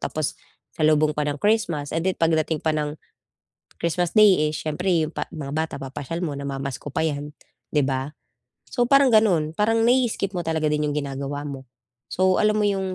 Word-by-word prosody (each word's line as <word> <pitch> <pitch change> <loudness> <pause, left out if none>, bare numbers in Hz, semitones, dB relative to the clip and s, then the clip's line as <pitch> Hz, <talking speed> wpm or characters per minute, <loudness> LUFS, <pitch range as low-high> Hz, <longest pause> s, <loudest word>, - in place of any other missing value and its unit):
tapos - - -2 0.4
salubong 155 -1 +3
pa 150 - -1
ng 145 0 -3
Christmas, 175 -9 0
and 165 - 0
then 185 - -1
pagdating 160 -1 +1
pa 155 -1 +2
ng 150 0 -3 0.8
Christmas 175 +2 0
day, 200 -8 +6
eh, - - -7
siyempre 160 +6 -2 0.2
pa - - -4
'yong 160 - -7
mga 140 0 -5
bata 160 0 -1
papasyal 140 +5 -5
mo, 150 -5 -2
namamasko 140 0 -5
pa 160 - +1
'yan 145 -1 -3 0.4
'di 145 - +4
ba? 135 +2 -2 0.6
So 245 -2 +1
parang 275 0 +5
ganoon, 190 -9 +3
parang 225 +2 +2
nai-skip 235 -5 +2
mo 175 - -2
talaga 160 -2 0
din 150 0 0
yung 145 - -2
ginagawa 140 0 -4
mo. 135 -2 -7 0.4
So 185 0 +2
alam 215 0 +3
mo - - +2
yung 190 -2 -1
155 Hz, 185 wpm, -23 LUFS, 145-190 Hz, 0.8 s, day